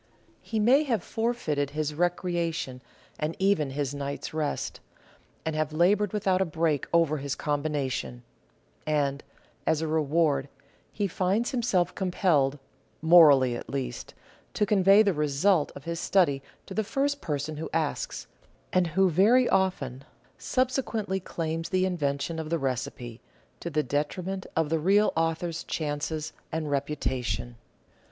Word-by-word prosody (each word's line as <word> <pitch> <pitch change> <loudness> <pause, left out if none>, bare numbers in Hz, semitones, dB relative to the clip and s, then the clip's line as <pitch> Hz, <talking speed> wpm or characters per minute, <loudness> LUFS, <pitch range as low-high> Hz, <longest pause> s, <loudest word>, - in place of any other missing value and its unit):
He 225 - -3
may 250 +7 +5
have 230 -9 0
forfeited 225 - -1
his 150 -1 -1
recreation 170 -5 -1 0.4
and 155 +2 -2
even 190 -7 +2
his 140 0 -2
night's 140 +1 -5
rest, 155 -2 -2 0.7
and 160 -1 -1
have 155 0 -1
laboured 190 +5 +3
without 190 -3 +1
a - - +5
break 160 -4 0
over 165 -3 +3
his 140 -1 -3
combination; 145 - -2 0.6
and, 140 -2 0 0.4
as 160 - +3
a 160 - -2
reward, 150 -2 +1 0.4
he 205 - -1
finds 195 +6 0
himself 225 -8 +1
compelled, 170 -7 +1 0.4
morally 150 -7 +6
at - - -7
least, 125 -3 -5 0.4
to 210 - +2
convey 200 +1 +5
the 200 -3 +2
result 150 +3 +2
of 140 - -9
his 170 +1 -4
study 155 -10 +2 0.2
to 195 - -8
the 220 - 0
first 280 +6 -1
person 150 0 -3
who 160 - -5
asks, - - -2 0.5
and 185 -1 +3
who, 190 +4 +3
very 215 +9 +4
often, 140 -9 0 0.4
subsequently 240 -6 -1
claims 165 -2 -4
the 185 0 +2
invention 160 -2 -1
of 155 -1 -5
the 165 - +1
recipe 125 -3 -4 0.2
— - - -36
to 170 - -4
the 155 -1 0
detriment 175 +8 -2
of 160 -2 +1
the 165 - +2
real 200 +6 +3
author's 165 +1 -1
chances 155 0 -3 0.2
and 160 0 -2
reputa 140 -2 -1
tion. 120 0 -3
160 Hz, 145 wpm, -27 LUFS, 145-190 Hz, 0.7 s, morally